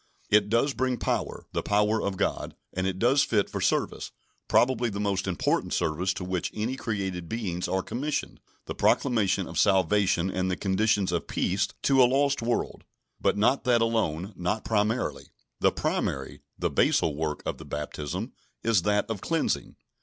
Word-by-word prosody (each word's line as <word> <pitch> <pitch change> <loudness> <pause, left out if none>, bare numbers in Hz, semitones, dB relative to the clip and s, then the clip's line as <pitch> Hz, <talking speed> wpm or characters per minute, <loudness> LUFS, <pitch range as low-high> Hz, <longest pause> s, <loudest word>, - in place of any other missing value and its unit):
It 105 -1 +4
does 120 +6 +2
bring 130 -1 0
power - - -2
the - - -1
power 105 +2 +2
of 100 -1 -2
God, - - -2 0.2
and 95 +1 -1
it 95 -1 -2
does 125 +7 +4
fit 105 -3 +1
for - - -3
service, - - 0 0.4
probably 120 -1 +3
the 100 -1 -5
most 100 -2 -1
important 90 - 0
service 90 +5 0
to 95 - -5
which 90 -1 -2
any 110 +5 -2
created 95 -8 -3
beings 95 -6 -2
are 95 0 0
commissioned, 145 +5 -3 0.3
the - - -4
proclamation 115 -8 +2
of - - -3
salvation 95 -1 +3
and 95 0 -1
the 90 - 0
conditions 100 0 +1
of 85 - -2
peace 100 +2 0 0.2
to 135 -1 +4
a 125 - +6
lost 140 +1 +2
world; 120 +1 -2 0.4
but - - +1
not 120 +6 +2
that 120 -2 +4
alone, 105 -5 -1
nor 95 +5 -1
primarily. 110 +2 -1 0.3
The - - +4
primary, 65 0 -2 0.2
the - - -1
basal 75 -3 +2
work 75 0 -3
of - - -3
the - - -9
baptism, 75 - -5 0.3
is 115 -5 +3
that 105 +3 +1
of 110 -4 -4
cleansing. 165 -1 -1
105 Hz, 170 wpm, -27 LUFS, 95-115 Hz, 0.4 s, a